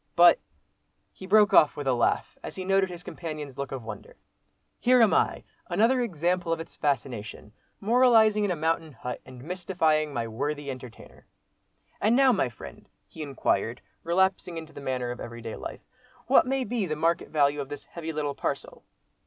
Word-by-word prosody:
But—" 175 0 +7 0.7
he 190 - -10
broke 210 +1 +5
off 155 -5 +6
with 145 - -4
a 135 - +2
laugh, 120 - 0
as - - -7
he 185 - -5
noted 195 0 +2
his 175 -1 -8
companion's 155 -7 -6
look 140 - -4
of 130 -3 -5
wonder, 110 -2 -9 0.6
"here 250 +1 +4
am 225 -3 +5
I, - - +1 0.2
another 250 +2 +3
example 175 -4 -1
of 165 - 0
its 165 - -9
fascination, 120 -7 -3 0.3
moralising 220 -1 +4
in 205 - +1
a 180 - 0
mountain 160 0 -1
hut 125 -1 -6
and 130 -1 -11
mystifying 160 -3 0
my 120 -4 -2
worthy 145 +5 -3
entertainer." 125 -3 -12 0.7
"And 220 +3 +3
now, 270 0 +6
my 190 - +1
friend!" 70 - -12 0.2
he 160 - -10
inquired, 125 -5 -1 0.2
relapsing 180 0 +1
into 160 -1 -8
the - - -9
manner 125 -3 -2
of 120 - -7
everyday 115 -1 -7
life, - - -7 0.4
"what 260 - +5
may 270 0 0
be 225 -4 -2
the 155 - -2
market 165 +2 0
value 145 -1 +2
of 135 - -7
this 145 - -7
heavy 165 -1 -6
little 150 -2 -2
parcel?" - - -4
160 Hz, 180 wpm, -27 LUFS, 135-190 Hz, 0.7 s, But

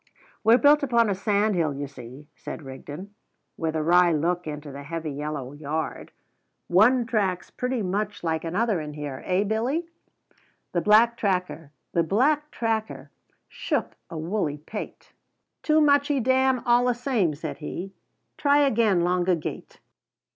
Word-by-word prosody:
"We're 225 +2 +6
built 295 +2 +5
upon 235 -6 +2
a - - +2
sandhill, 195 -6 +1
you 145 +1 -4
see," 135 +1 -11
said - - -8
Rigden, 145 +8 -9 0.4
with 160 -1 -2
a 155 - 0
wry 175 +2 +5
look 170 +2 0
into 150 -1 -6
the 140 +1 -8
heavy 160 +1 -5
yellow 145 -2 -5
yard: 155 +2 -4 0.6
"one 235 +7 +4
track's 195 -6 -1
pretty 250 -3 -2
much 205 +2 -2
like 160 -1 -1
another 190 +2 0
in 150 -1 -7
here, 145 -3 -6
eh, 185 +2 +2
Billy?" 240 +11 -1 0.8
The 175 - 0
black 225 +4 +5
tracker 180 -7 -2 1.8
shook - - -3
a 165 - -6
woolly 160 -2 -2
pate. 185 +8 -8 0.5
"Too 310 0 +3
muchee 285 -1 +3
damn 260 0 +2
allasame," 240 - +2
said 145 - -6
he. 180 +5 -6 0.5
"Try 285 0 +4
again 220 -8 +2
longa 180 0 +2
gate." 160 - -7
185 Hz, 135 wpm, -25 LUFS, 155-235 Hz, 1.8 s, We're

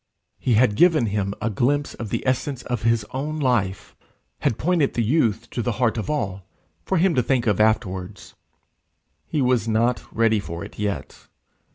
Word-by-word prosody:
He 120 - +1
had 110 -1 +4
given 160 +1 +4
him 100 -1 -2
a 115 - 0
glimpse 140 +7 0
of 115 - -6
the - - -3
essence 130 0 -1
of 120 -3 -3
his 115 -2 +1
own 145 +4 -3
life, 115 -10 -1 0.4
had 110 - 0
pointed 165 -3 +1
the 120 - +1
youth 115 -4 +1
to 120 - -2
the 120 0 -1
heart 115 -1 +1
of 110 +4 -4
all 100 -10 -2 0.4
for 190 - 0
him 175 +1 +3
to 125 - +3
think 125 0 0
of 105 -4 +1
afterwards: 105 -4 -1 0.9
he 145 - 0
was 125 -3 +2
not 115 +2 +1
ready 115 -1 +2
for 85 -1 -6
it 105 - -13
yet. 100 -8 -4
115 Hz, 180 wpm, -23 LUFS, 105-130 Hz, 0.9 s, had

